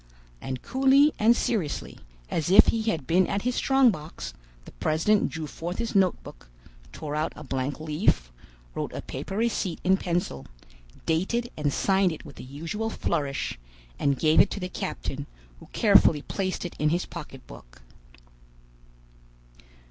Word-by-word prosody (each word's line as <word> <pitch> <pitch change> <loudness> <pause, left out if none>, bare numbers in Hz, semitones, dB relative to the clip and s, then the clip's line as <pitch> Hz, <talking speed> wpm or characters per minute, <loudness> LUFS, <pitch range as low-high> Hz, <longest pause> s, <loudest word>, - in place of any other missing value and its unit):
And 130 -2 -5
coolly 270 +3 +4
and 230 +3 +5
seriously, 185 -11 -2 0.3
as 160 0 -1
if 195 - +8
he 225 - +1
had 155 -10 -2
been 180 +4 +3
at 200 0 -2
his 250 +1 0
strong 270 -1 +4
box, 150 - -7 0.3
the - - -11
president 160 - +1
drew 160 -1 -5
forth 170 +4 -6
his 230 -1 -3
notebook, 175 - 0 0.4
tore 150 - -5
out 155 +1 -1
a 155 - -9
blank 135 0 -3
leaf, 150 - 0 0.4
wrote - - -3
a - - -5
proper 195 - -6
receipt 220 -6 -1
in 190 +1 +4
pencil, 170 - -2 0.6
dated 215 +9 0
and 150 -2 0
signed 190 +3 +2
it 160 - -8
with 145 - -12
the - - -8
usual 165 - -4
flourish, 140 - -2 0.4
and 140 -1 +1
gave 155 +2 +4
it 200 - +6
to - - -5
the 180 -1 -4
captain, - - -5 0.3
who - - -14
carefully 150 -3 +4
placed 185 -2 -3
it 175 - -6
in 150 - +2
his 175 +3 0
pocketbook. 125 - -11
165 Hz, 155 wpm, -26 LUFS, 145-200 Hz, 0.6 s, if